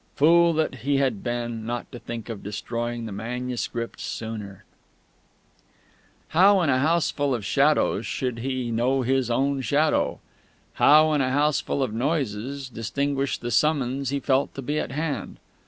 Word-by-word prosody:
Fool 170 +3 +5
that 155 -3 -1
he 140 +1 +1
had 130 -7 0
been, 120 -2 -3
not 120 +1 -4
to 120 - -8
think 115 -2 -7
of 115 -4 -6
destroying 115 +3 -4
the 110 - -6
manuscript 120 +2 -4
sooner!... 105 -4 -6 1.7
How, 195 +4 +5
in 155 -5 +2
a 130 - +2
houseful 145 -2 +1
of 110 -4 -5
shadows, 145 +7 +2
should 125 -3 -3
he 130 -1 -2
know 125 +3 +1
his 130 0 +1
own 135 +3 +1
Shadow? 150 +4 +1 0.5
How, 155 +1 +5
in 145 - +2
a 130 - +1
houseful 145 0 +1
of 110 - -3
noises, 135 0 -2
distinguish 135 +3 -2
the 120 - -5
summons 140 -2 +1
he 140 +1 -1
felt 135 0 0
to 135 - -6
be 150 +4 -1
at - - -4
hand? 150 0 -3
130 Hz, 155 wpm, -25 LUFS, 120-145 Hz, 1.7 s, Fool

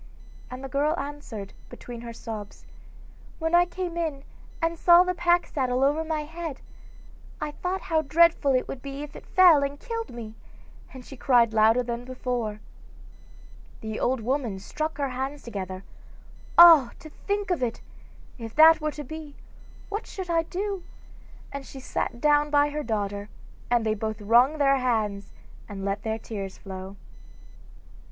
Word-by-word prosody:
and 255 +1 -8
the - - -4
girl 290 +5 0
answered, 275 -8 -7 0.2
between 240 -1 -9
her 235 0 -7
sobs: 220 -3 -8 0.7
'When 325 0 -2
I 350 0 +6
came 350 -1 -5
in 310 -5 -2 0.4
and 330 0 0
saw 345 0 +7
the 365 0 -1
pack 350 0 +2
saddle 255 -2 -1
over 295 +3 +2
my 315 -1 -2
head, 325 -2 -6 0.8
I 300 - -3
thought 365 +5 -3
how 320 -4 +1
dreadful 315 -1 +4
it 255 - +1
would 260 - -7
be 275 +1 -6
if 295 - -10
it - - -11
fell 355 -6 +6
and 280 0 -3
killed 460 -2 -5
me,' 230 -3 -8 0.6
and 255 -2 -11
she 275 - -10
cried 240 -3 +3
louder 225 +3 +4
than 240 0 -4
before. 245 -4 -4 1.2
The 220 0 -5
old 255 -1 0
woman 245 -3 -1
struck 310 +10 -4
her 280 -2 -1
hands 265 +3 -4
together: 190 -4 -6 0.7
'Ah, 330 -7 +9
to 310 - -12 0.2
think 405 -1 -1
of 345 - 0
it! 235 -2 -2 0.6
if 225 -1 -8
that 320 +1 +7
were 305 - 0
to 295 - -7
be, 305 0 -9 0.5
what 415 +2 -4
should 370 -3 -5
I 330 -1 +3
do?' 385 +3 -4 0.7
and 280 0 -6
she 270 - -10
sat 245 -2 -3
down 295 +1 +3
by 290 0 +3
her 300 +1 -3
daughter, 205 -3 -3 0.4
and 240 -2 +2
they 215 - +2
both 220 0 -4
wrung 240 +8 +4
their 275 -2 +4
hands 215 -6 -1 0.4
and 195 -1 -6
let 200 +1 -2
their 220 0 -2
tears 200 -4 -7
flow. 190 0 -8
275 Hz, 165 wpm, -26 LUFS, 230-320 Hz, 1.2 s, Ah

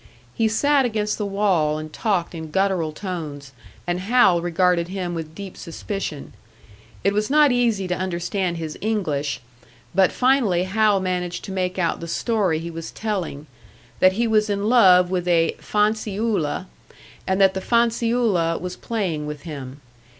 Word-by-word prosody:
He 225 - +1
sat 280 +6 +3
against 215 -3 -1
the 205 - -1
wall 190 -7 +1
and 155 0 -7
talked 195 -7 -1
in 160 -2 -7
guttural 190 -3 0
tones, 155 -6 -6 0.3
and 175 0 -1
Hal 190 -4 +4
regarded 175 0 +1
him 180 -2 -4
with 160 -1 -6
deep 200 -2 -8
suspicion. 165 -3 -6 0.7
It 200 - +2
was 210 +1 0
not 295 -1 +5
easy 230 -6 +1
to 180 - -1
understand 180 0 -2
his 160 -2 -6
English, 155 -12 -1 0.5
but 190 -2 +4
finally 250 -9 +2
Hal 205 +1 +2
managed 180 -1 -3
to - - -7
make 185 -1 -2
out 175 -2 0
the 170 - -6
story 195 -3 0
he 170 +1 -5
was 165 0 -6
telling 185 -9 -4 0.5
that 185 0 +5
he 235 +4 0
was 215 -1 +2
in 200 0 -1
love 185 -7 +6
with 180 -1 -1
a 165 -2 +2
"fanciulla," 210 -5 0 0.6
and 190 +1 +1
that 190 -1 +5
the 190 - -3
"fanciulla" 230 -7 +1
was 180 0 -5
playing 180 -10 -3
with 150 -1 -7
him. 140 -4 -8
185 Hz, 155 wpm, -22 LUFS, 170-210 Hz, 0.7 s, love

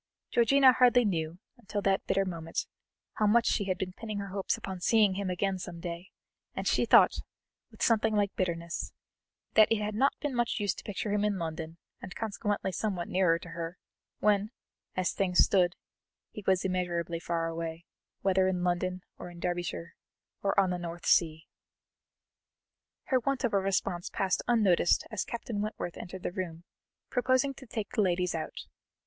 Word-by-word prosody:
Georgiana 260 +2 +6
hardly 245 -1 +5
knew, 165 -4 -1 0.2
until 215 -2 -4
that 195 0 +1
bitter 195 0 +2
moment, 165 -3 -3 0.5
how 215 - +3
much 230 +3 +4
she 200 - +1
had 185 -1 -1
been 185 0 -4
pinning 215 0 -6
her 200 -1 -4
hopes 195 0 -1
upon 190 -1 -6
seeing 210 +1 +4
him 195 0 -2
again 190 +1 -1
some 175 -1 -7
day; 170 +1 -6 0.5
and - - -3
she - - +2
thought, - - +6 0.5
with - - -6
something 220 -1 +3
like 205 -1 +1
bitterness, 170 -2 -3 0.6
that 215 0 +6
it - - +5
had 210 0 -2
not 265 +6 +2
been 290 -3 -2
much 240 -1 0
use 205 -2 +1
to - - -11
picture 205 0 -3
him 210 0 +1
in 210 -2 +1
London, 160 -1 -5 0.2
and 185 - -8
consequently 205 -3 -2
somewhat 185 -2 -2
nearer 180 -3 +3
to 170 - -11
her, 165 +1 -5 0.4
when, 210 0 +2 0.5
as 185 -1 +1
things 180 -2 0
stood, 180 -2 +4 0.6
he 210 - -8
was 190 0 +3
immeasurably 175 -2 -1
far 170 0 -1
away, 165 0 -4 0.4
whether 190 -1 +3
in 180 -1 0
London 180 +1 -1 0.2
or - - -7
in 175 -1 -12
Derbyshire 175 -1 -3 0.5
or 200 0 +2
on 190 -2 +3
the 180 - -2
North 170 0 -6
Sea. 160 -2 +3 1.6
Her 260 - +2
want 270 +2 -1
of 240 - +1
response 195 -2 0
passed 190 -2 0
unnoticed 205 -8 +3
as 220 - -1
Captain 230 -3 -4
Wentworth 210 -5 -4
entered 180 +1 -8
the - - -2
room, 175 -3 -5 0.5
proposing 260 +2 +2
to 265 -1 -13
take 220 -2 -4
the - - +1
ladies 180 -2 +1
out. 160 -1 -5
190 Hz, 175 wpm, -30 LUFS, 175-210 Hz, 1.6 s, Georgiana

